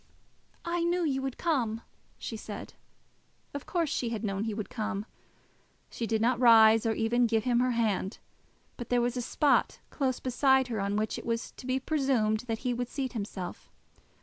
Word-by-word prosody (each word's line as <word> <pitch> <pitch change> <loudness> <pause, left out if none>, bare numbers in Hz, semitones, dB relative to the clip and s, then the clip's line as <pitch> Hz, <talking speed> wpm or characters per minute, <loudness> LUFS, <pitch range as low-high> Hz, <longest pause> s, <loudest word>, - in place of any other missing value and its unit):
"I 340 0 -1
knew 345 0 +1
you 270 -3 0
would 265 -1 -4
come," 240 -10 0 0.4
she 225 - -5
said. 215 -1 -8 0.8
Of 285 - -6
course 340 -3 0
she 245 -4 -1
had 225 -1 -4
known 195 -2 -1
that - - -1
he 220 - -2
would 215 -1 -4
come. 215 -2 -3 0.9
She 230 - -3
did 220 0 +1
not 245 0 +2
rise, 225 -2 +7
or 225 - +2
even 235 +2 +2
give 225 -1 +1
him 240 -1 +2
her 255 +1 +2
hand, 210 -3 0 0.6
but 240 - -7
there 245 - +3
was 240 +1 0
a 250 - -1
spot 285 +4 +2
close 260 -3 -1
beside 265 0 +3
her 225 -3 -2
on 200 +1 -1
which 215 +1 -1
it - - -11
was 230 0 -2
to 255 - -11
be 260 +1 +1
presumed 260 -7 +1
that 225 -1 -1
he 250 - +1
would 245 0 -3
seat 265 -3 -3
himself. 200 -5 -6
235 Hz, 195 wpm, -29 LUFS, 220-265 Hz, 0.9 s, rise